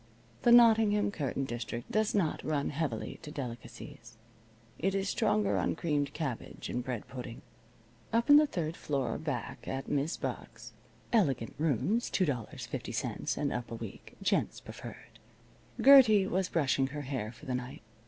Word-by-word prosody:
The 240 - +4
Nottingham 220 -4 +6
curtain 140 -6 -2
district 120 -1 -5
does 215 0 +1
not 175 -7 0
run 145 -2 -1
heavily 140 -7 -3
to 150 - -8
delicacies. 120 -3 -8 0.6
It 195 +3 0
is 195 0 0
stronger 210 -2 +1
on - - 0
creamed 145 -4 -1
cabbage 145 -7 -5
and 125 - -2
bread 125 -3 -4
pudding. 125 -2 -8 0.7
Up 230 +1 +2
in 290 0 +9
the 300 0 +5
third 165 - -3
floor 135 -8 -2
back 145 -6 -5
at 135 0 -4
Mis' 145 +3 -1
Buck's - - -6 0.4
(elegant 140 - +2
rooms 165 - +1
$2.50 145 - -2
and 145 - -1
up 120 -1 -4
a 115 - -5
week. 115 -3 -9
Gents - - +1
preferred) - - -11 0.6
Gertie 255 -8 +8
was 190 0 0
brushing 135 -4 +1
her 145 +2 -5
hair 130 -6 -3
for 120 +6 -15
the 130 - -2
night. 125 -2 -5
150 Hz, 150 wpm, -31 LUFS, 125-200 Hz, 0.7 s, in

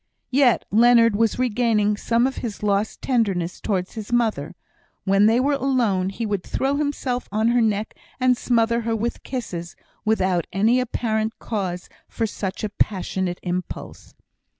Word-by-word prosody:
Yet 260 -2 +3
Leonard 230 0 +5
was 225 +1 +1
regaining 225 -4 +1
some 230 +3 +1
of 265 - -2
his 215 -3 -5
lost 205 +1 0
tenderness 195 -9 0
towards 185 -4 -2
his 220 0 -7
mother; 215 -10 0 0.5
when 195 +2 +4
they 225 +2 +4
were 280 +3 +2
alone 245 -9 +1
he 225 +4 -4
would 205 -3 -1
throw 270 +1 -1
himself 280 -4 -2
on 220 +2 +2
her 240 0 +3
neck 215 -1 0 0.3
and 255 -1 +4
smother 235 -1 +1
her 230 0 -1
with 230 +2 -3
kisses, 180 -10 -5 0.3
without 185 -6 +1
any 220 +6 +3
apparent 225 -3 -1
cause 185 -5 -4 0.2
for 230 - -2
such 200 -2 -4
a 215 - -1
passionate 190 -3 -1
impulse. 180 0 -5
220 Hz, 150 wpm, -23 LUFS, 195-240 Hz, 0.5 s, Leonard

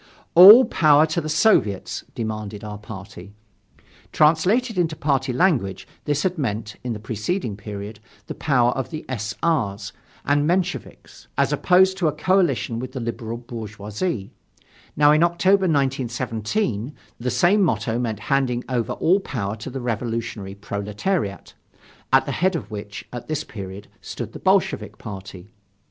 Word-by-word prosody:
All 205 +9 +11
power 150 -1 +4
to 160 +2 -2
the 155 - -5
Soviets! 155 - +2
demanded 110 -2 -5
our 105 -1 -7
party. 100 -2 -10 0.8
Translated 185 +11 +3
into 165 -3 0
party 140 -3 0
language, 125 - +1 0.2
this 145 -1 0
had 185 -2 -1
meant, 110 -5 -3
in 125 -2 -2
the 105 - -6
preceding 110 - -3
period, 105 0 -8 0.3
the - - -6
power 125 -5 +2
of 130 0 -3
the 155 -2 -7
S. 110 -4 -4
R.'s 115 -12 0 0.3
and 145 +1 +2
Mensheviks, 180 +2 -3
as - - +2
opposed 190 +1 +4
to 170 - +2
a - - +2
coalition 155 -7 +1
with 130 +1 -6
the 130 - -4
liberal 115 -1 -4
bourgeoisie. 110 - -5 0.7
Now, 145 0 +6
in 155 +1 +4
October 185 +3 +3
1917, 130 - -1 0.2
the 125 +1 -2
same 185 - +3
motto 115 - 0
meant 110 -4 -3
handing 125 0 0
over 125 -3 -1
all 185 +4 +2
power 110 - -4
to 110 - -7
the 130 0 -6
revolutionary 115 -4 -3
proletariat, 100 - -3 0.6
at - - +5
the - - -3
head 185 +1 +1
of 120 -9 -5
which, 105 -1 -7
at 120 - -7
this 155 -1 -2
period, 100 -4 -8
stood - - -7
the - - -8
Bolshevik - - +1
party. 95 0 -9
125 Hz, 150 wpm, -22 LUFS, 105-160 Hz, 0.8 s, All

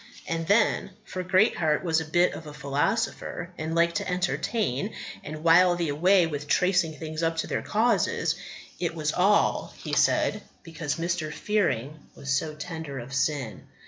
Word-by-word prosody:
And 165 -1 -2
then 210 0 +3 0.2
for 185 - -5
Greatheart 180 -4 +2
was 165 -2 +2
a - - -5
bit 175 +3 +2
of 160 - -8
a 150 - -9
philosopher, 170 +5 -2
and 160 0 -4
liked 170 0 +3
to - - -3
entertain 180 - -1 0.3
and 155 +1 -7
while 175 +2 +6
the 170 -3 -1
away 180 +5 +4
with 145 -2 -5
tracing 180 -1 +2
things 155 0 -5
up 165 0 0
to - - 0
their - - -2
causes 225 +3 +1 0.5
"it 170 -2 -2
was 155 -2 -1
all," 200 +3 +2
he - - -7
said, - - +2 0.2
"because 160 -3 -4
Mr. 165 -2 -2
Fearing 155 - -1 0.2
was 140 - -5
so 150 +3 0
tender 160 -3 -6
of 130 +2 -7
sin. 135 -4 -1
165 Hz, 165 wpm, -26 LUFS, 150-180 Hz, 0.5 s, while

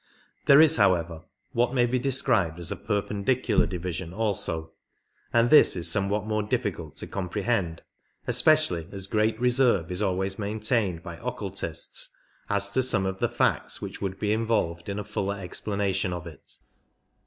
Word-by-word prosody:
There 140 +1 +7
is, 160 0 +5
however, 85 -2 +1 0.3
what 120 +2 +1
may 120 -1 +4
be 125 +1 0
described 120 -10 +1
as 85 -1 -4
a - - -1
perpen 105 -1 -3
dicular 125 -2 +2
division 90 -1 -5
also, 90 -7 -1 0.6
and 120 0 +3
this 155 - +7
is 85 -2 +1
somewhat 100 +1 +1
more 110 0 0
difficult 105 - -3
to - - -4
comprehend, 95 -2 -2 0.4
especially 125 - +3
as 95 -2 -5
great 110 +2 0
reserve 120 -8 +2
is 90 +2 -1
always 95 0 -1
maintained 105 -3 -1
by 85 -3 -8
occultists 100 -9 -5 0.4
as 100 0 +1
to 130 - +2
some 110 -7 +2
of 95 0 -3
the - - +1
facts - - 0
which - - -7
would 95 -1 -3
be 105 0 +1
in 110 +1 -1
volved 85 -6 -1
in 100 - -3
a 105 - -3
fuller 100 -1 -3
explanation 100 0 -2
of 90 -1 -6
it. 80 -4 -12
100 Hz, 165 wpm, -26 LUFS, 90-115 Hz, 0.6 s, There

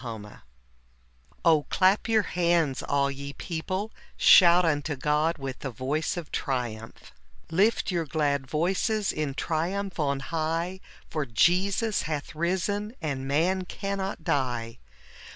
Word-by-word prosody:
ioo 115 -3 -5 1.3
© 160 -3 +4
clap 190 +2 +4
gout 220 -3 +1
Ijantfg, 170 -6 +1
all 140 0 +2
ge 140 +1 -7
people: 185 +5 -3 0.3
gfjout 175 -1 +7
unto 145 -1 0
©oti 150 +4 +1
foitfj 135 -2 -4
tfje 135 -5 -6
botce 145 +8 -1
of 170 -3 -6
triumph" 120 -4 -4 0.4
Lift 200 +5 +2
your 170 -3 -1
glad 140 -2 0
voices 190 - 0
in 150 -3 -3
triumph 180 +6 -2
on 140 -2 0
high, 165 +4 -2 0.3
For 155 -3 -3
Jesus 190 - +2
hath 150 -1 -4
risen, 190 +7 -1
and 140 -5 -3
man 180 +7 +1
cannot 195 -2 -4
die. 120 -6 -1
160 Hz, 125 wpm, -27 LUFS, 140-185 Hz, 1.3 s, gfjout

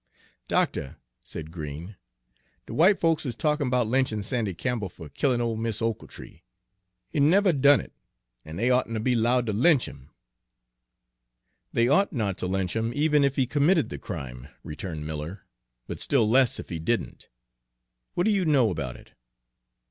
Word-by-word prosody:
"Doctuh," 65 - 0 0.3
said 80 0 -8
Green, 80 +4 -7 0.7
"de - - -8
w'ite 190 +6 +4
folks 165 -2 +2
is 125 -6 -4
talkin' 150 -1 0
'bout 125 -1 +2
lynchin' 115 -3 0
Sandy 110 -4 -1
Campbell 115 -1 -2
fer 80 -3 -11
killin' 125 - 0
ole 115 -1 -1
Mis' 110 -1 -1
Ochiltree. 115 -1 -5 0.7
He - - -1
never 180 +6 +4
done 140 0 +5
it, - - -10 0.5
an' 80 +1 -9
dey 120 +7 +1
oughtn' 125 -2 +1
ter - - -1
be 125 +3 +1
'lowed 120 +1 +2
ter 110 - -1
lynch 130 +5 +4
'im." 70 -1 -12 1.6
"They 115 0 +2
ought 175 +10 +3
not 105 -7 -2
to - - -2
lynch 95 0 -1
him, 115 +1 0
even 150 0 +3
if 140 -1 +1
he 135 - +2
committed 150 +6 +2
the 70 - -6
crime," 60 0 -7 0.2
returned 75 0 -6
Miller, 80 +5 -5 0.4
"but - - -6
still 120 -6 +2
less 125 +2 +3
if - - -8
he 85 - -4
didn't. 80 - -3 0.9
What 175 - +1
do 220 - +3
you 200 -3 +2
know 135 - +3
about 70 -8 -4
it?" - - -18
115 Hz, 170 wpm, -26 LUFS, 90-140 Hz, 1.6 s, done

